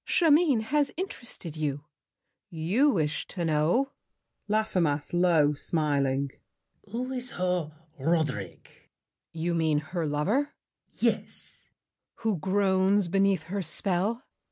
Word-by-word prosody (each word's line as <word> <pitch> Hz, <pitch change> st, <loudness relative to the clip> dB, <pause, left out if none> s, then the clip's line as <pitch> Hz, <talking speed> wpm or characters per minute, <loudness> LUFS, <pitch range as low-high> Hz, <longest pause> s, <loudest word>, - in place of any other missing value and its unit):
Chimène 315 Hz, -7 st, +4 dB
has 285 Hz, +5 st, +1 dB
interested 240 Hz, -, -5 dB
you. 145 Hz, -2 st, -2 dB, 0.6 s
You 180 Hz, -, +2 dB
wish 155 Hz, -, 0 dB
To 175 Hz, -3 st, -3 dB
know— 165 Hz, -, +2 dB, 0.6 s
LAFFEMAS 180 Hz, -10 st, 0 dB
(low, 170 Hz, -4 st, +4 dB
smiling). 140 Hz, -3 st, 0 dB, 0.6 s
Who 250 Hz, +3 st, -3 dB
is 250 Hz, -1 st, -4 dB
her 180 Hz, -3 st, -1 dB, 0.3 s
Roderick? 155 Hz, -1 st, -1 dB
GRACIEUX. -, -, -23 dB, 0.4 s
You 165 Hz, +1 st, -1 dB
mean 160 Hz, -2 st, +2 dB
Her 155 Hz, +3 st, -2 dB
lover? 205 Hz, -, 0 dB, 0.3 s
LAFFEMAS. -, -, -13 dB
Yes! -, -, +6 dB, 1.0 s
GRACIEUX. -, -, -21 dB
Who 220 Hz, -4 st, +1 dB
groans 190 Hz, +1 st, +2 dB
beneath 195 Hz, +1 st, +2 dB
her 200 Hz, +2 st, -3 dB
spell? 195 Hz, -, -1 dB
180 Hz, 115 wpm, -28 LUFS, 155-220 Hz, 1.0 s, Yes